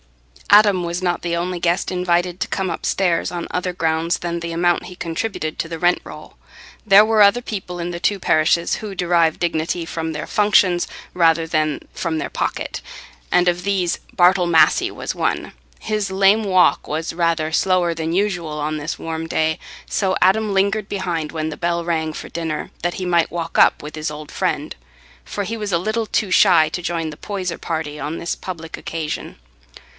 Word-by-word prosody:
Adam 205 -3 +6
was 170 +1 -3
not 175 -1 0
the 170 -1 -1
only 175 +1 -2
guest 175 +3 +1
invited 180 0 0
to - - -1
come 190 -1 -2
upstairs 175 -2 0
on 175 -1 -4
other 180 0 -1
grounds 165 -1 0
than 170 -1 -3
the 170 0 -5
amount 175 +1 +1
he 180 - -10
contributed 165 -1 -3
to 165 - -3
the 165 -1 -5
rent 175 +1 +2
roll. - - -11 0.5
There 205 0 +7
were 220 -1 +3
other 205 +4 +6
people 190 -6 -5
in 175 +1 -3
the 170 0 -6
two 205 0 +1
parishes 155 0 +2
who 210 -3 -7
derived 170 -3 +2
dignity 170 0 -1
from 160 -1 -4
their 150 -1 -5
functions 200 -4 +3 0.3
rather 165 -2 +3
than 155 -2 0
from 165 -2 -2
their - - -4
pocket, - - -3 0.5
and 180 0 +4
of 175 0 +1
these 190 -3 0
Bartle 180 0 +4
Massey 165 -2 +4
was - - -5
one. - - -1 0.3
His 210 -2 -2
lame 195 +3 +4
walk 185 -2 +3
was 160 +2 -3
rather 165 -2 0
slower 180 -1 +2
than 160 0 -3
usual 175 -5 -1
on 150 +1 -2
this 150 +1 -4
warm 165 0 -4
day, 160 0 0 0.3
so 190 -2 0
Adam 210 +3 +3
lingered 200 +1 +1
behind 175 -6 -2
when 155 -1 -3
the 160 - -4
bell 170 -1 -1
rang 160 -2 -1
for - - -7
dinner, 160 -2 -4
that 175 +1 -1
he 185 - -4
might 170 -2 +2
walk 170 -1 -4
up - - +5
with 150 +1 -7
his 155 0 -3
old 150 0 -9
friend; - - -2 0.5
for 205 - -4
he 225 - -3
was 210 -2 -4
a 170 - +3
little 215 +5 -2
too 205 -3 0
shy 175 -5 +6
to 180 - -4
join 170 -2 -2
the 150 - -11
Poyser 185 -3 -4
party 155 -3 -4
on 150 +4 -4
this 170 - -3
public 165 -3 -7
occasion. 160 -2 -5
175 Hz, 190 wpm, -20 LUFS, 165-185 Hz, 0.5 s, There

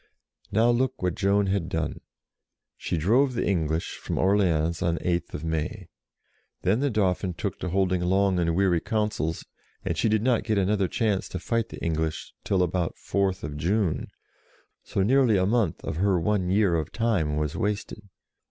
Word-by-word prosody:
Now 115 +4 +4
look 130 -1 0
what 90 -2 +1
Joan 100 +2 +2
had 95 -3 -1
done. 80 -3 -3 0.7
She - - -3
drove 125 - +2
the 120 - 0
English 80 -4 -1
from - - -4
Orleans 85 -4 +2
on 85 -1 +1
8th 85 -3 -2
May. 80 +4 -3 0.7
Then 100 +6 +2
the 140 +1 +1
Dauphin 95 -5 0
took - - -4
to 90 - -3
holding 95 0 +1
long 95 +1 +2
and 85 -1 +1
weary 90 -2 +3
councils, 105 -6 -2 0.4
and - - -1
she 115 - +1
did 110 0 +1
not 125 -2 +2
get 110 -2 0
another 100 0 +2
chance 105 -1 -1
to 95 - -4
fight 115 -1 -1
the - - -8
English 80 -1 -2
till 95 -2 +2
about 90 -1 -1
4th 95 -7 -2
June, 90 +2 0 0.8
so 95 - -1
nearly 125 -1 +4
a 95 - +2
month 105 -5 0
of - - -4
her 95 0 +2
one 95 +1 0
year 100 -1 +3
of 80 -3 -1
time 100 -11 0
was 75 0 -1
wasted. 105 -1 -3
95 Hz, 170 wpm, -26 LUFS, 85-105 Hz, 0.8 s, Now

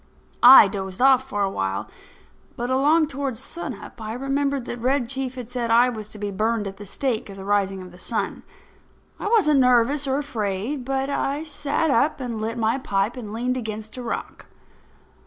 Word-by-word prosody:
I 245 -3 +10
dozed 190 -2 -5
off 265 0 +4
for 205 -4 -1
a 195 - +1
while, 95 - -2 0.7
but 240 +2 -3
along 295 +5 +4
toward 275 -4 -4
sun 270 +1 -5
up 205 - -12
I 215 0 -4
remembered 275 +1 -1
that 240 - -5
Red 255 0 +1
Chief 265 0 -3
had 250 -3 -7
said 245 -1 -3
I 240 +2 +5
was 215 -3 -7
to 215 - -12
be 205 -1 -4
burned 215 +2 0
at 195 0 -6
the 205 - -10
stake 235 0 -2
at 195 - -8
the 195 0 -9
rising 195 -2 0
of 180 - -11
the 180 - -15
sun. 225 +5 -2 0.8
I - - -3
wasn't 390 -11 +4
nervous 250 +3 +3
or 265 0 +1
afraid; 235 -1 -3
but 270 +1 -1
I 280 +2 -1
sat 295 0 -1
up 280 +5 +2
and 235 -4 -4
lit 225 +2 -3
my 225 +3 +1
pipe 200 -1 -1
and 225 -5 -7
leaned 250 +3 -1
against 220 -2 -6
a 255 - -6
rock. 240 - -5
245 Hz, 195 wpm, -23 LUFS, 210-270 Hz, 0.8 s, I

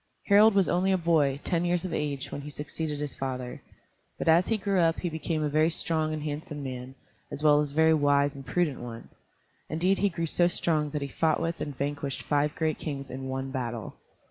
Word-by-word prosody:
Harald 210 +1 +6
was 195 -3 +4
only 185 +2 +2
a 190 - +3
boy, 155 -5 +2
ten 170 -1 0
years 175 +1 0
of 175 - -4
age, 145 -3 -2
when 140 - -5
he 145 - -7
succeeded 150 +1 -4
his 145 -1 -4
father; 130 -2 -5 0.6
but - - -4
as 165 +3 +5
he 225 - +1
grew 195 -2 0
up 165 -1 +3
he 175 - -1
became 160 0 -2
a - - +1
very 155 +2 +3
strong 160 -1 0
and 155 -1 -3
handsome 150 -1 -5
man, 130 0 -6 0.4
as 150 - -6
well 150 -1 +6
as 145 -1 -2
a - - -12
very 160 0 +5
wise 145 -2 +3
and 135 -1 -11
prudent 155 0 0
one. 115 -1 -8 0.6
Indeed 180 +5 +1
he 200 - +3
grew 170 -2 -3
so 175 +2 +3
strong 155 -3 +1
that 145 0 -3
he - - -3
fought 155 +2 +1
with 165 +1 -2
and 145 -3 -4
vanquished 140 -1 -3
five 150 0 +1
great 160 -2 -1
kings 140 -3 -5
in 130 +1 -5
one 135 0 -3
battle. 120 -5 -4
150 Hz, 220 wpm, -28 LUFS, 140-165 Hz, 0.6 s, Harald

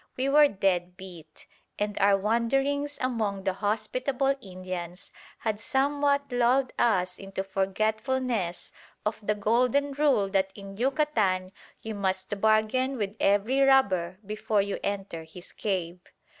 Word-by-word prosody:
We 260 +2 0
were 295 +1 +7
dead 180 -5 -1
beat, 170 -5 -12 0.3
and 210 0 -2
our 200 0 +5
wanderings 270 +7 0
among 220 -6 -1
the 190 -1 0
hospitable 250 +7 0
Indians 185 -2 -7 0.3
had 215 -2 -2
somewhat 280 +2 +1
lulled 245 +2 +2
us 185 -6 +1
into 195 0 -5
forgetfulness 215 +1 -1 0.3
of 210 +1 -1
the 210 0 0
golden 250 +7 +2
rule 275 -8 +2
that 190 -1 +1
in 195 -1 -9
Yucatan 220 -8 +1 0.3
you 220 - -4
must 190 0 -2
bargain 220 +5 +2
with 205 -2 -3
every 205 +7 +2
robber 195 -11 +3
before 215 0 0
you 200 0 -4
enter 195 -5 -3
his 175 +2 -12
cave. 180 -4 -3
210 Hz, 130 wpm, -27 LUFS, 190-255 Hz, 0.3 s, were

